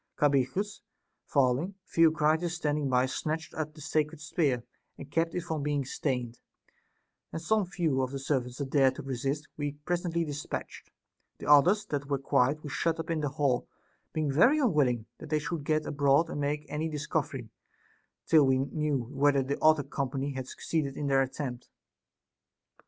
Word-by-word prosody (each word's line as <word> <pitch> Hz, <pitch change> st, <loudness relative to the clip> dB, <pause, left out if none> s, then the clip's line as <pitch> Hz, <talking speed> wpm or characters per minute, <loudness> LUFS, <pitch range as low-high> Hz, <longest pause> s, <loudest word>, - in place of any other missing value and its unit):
Cabirichus 145 Hz, +9 st, +1 dB, 0.5 s
falling, 140 Hz, +7 st, +1 dB
Theocritus 160 Hz, +1 st, +3 dB
standing 150 Hz, -4 st, -1 dB
by 125 Hz, 0 st, +3 dB
snatched 155 Hz, +4 st, -3 dB
up 155 Hz, -1 st, -4 dB
the 155 Hz, -, -12 dB
sacred 155 Hz, +1 st, -1 dB
spear, 145 Hz, -5 st, 0 dB, 0.3 s
and 140 Hz, 0 st, -10 dB
kept 165 Hz, +2 st, 0 dB
it 180 Hz, -, 0 dB
from 160 Hz, -3 st, -3 dB
being 145 Hz, -1 st, 0 dB
stained; 125 Hz, -3 st, -3 dB, 0.9 s
and -, -, -4 dB
some 205 Hz, +3 st, +1 dB
few 165 Hz, -7 st, 0 dB
of 130 Hz, -, -1 dB
the 140 Hz, -, -4 dB
servants 130 Hz, -3 st, -2 dB
that 140 Hz, -2 st, -4 dB
dared 135 Hz, -3 st, +4 dB
to 150 Hz, -, -7 dB
resist 135 Hz, +3 st, -2 dB
we 145 Hz, -1 st, -2 dB
presently 170 Hz, -1 st, 0 dB
despatched; 145 Hz, -1 st, -6 dB, 0.5 s
the -, -, -9 dB
others 175 Hz, +9 st, +6 dB
that 145 Hz, -6 st, -3 dB
were 140 Hz, -, +1 dB
quiet 135 Hz, +1 st, +2 dB
Ave 150 Hz, -, -7 dB
shut 165 Hz, +4 st, 0 dB
up 165 Hz, -, -3 dB
in 165 Hz, -, 0 dB
the 145 Hz, -, 0 dB
hall, 135 Hz, -3 st, 0 dB, 0.4 s
being 155 Hz, -3 st, -1 dB
very 235 Hz, -, +5 dB
unwilling 145 Hz, -, +2 dB
that 155 Hz, -, -9 dB
they 155 Hz, -, +2 dB
should 150 Hz, 0 st, -3 dB
get 155 Hz, 0 st, +1 dB
abroad 145 Hz, +2 st, +2 dB
and 145 Hz, -, -3 dB
make 150 Hz, +1 st, -1 dB
any 155 Hz, +2 st, -2 dB
discovery, 150 Hz, -5 st, -3 dB, 0.7 s
till 155 Hz, -4 st, +5 dB
we 130 Hz, 0 st, +4 dB
knew 140 Hz, 0 st, -1 dB
whether 140 Hz, -1 st, +3 dB
the 140 Hz, +2 st, -3 dB
other 155 Hz, -2 st, +5 dB
company 140 Hz, 0 st, -3 dB
had 130 Hz, -1 st, -5 dB
succeeded 145 Hz, -3 st, -2 dB
in 150 Hz, -, -2 dB
their 135 Hz, -1 st, +3 dB
attempt. 130 Hz, -2 st, -4 dB
145 Hz, 170 wpm, -29 LUFS, 135-160 Hz, 0.9 s, others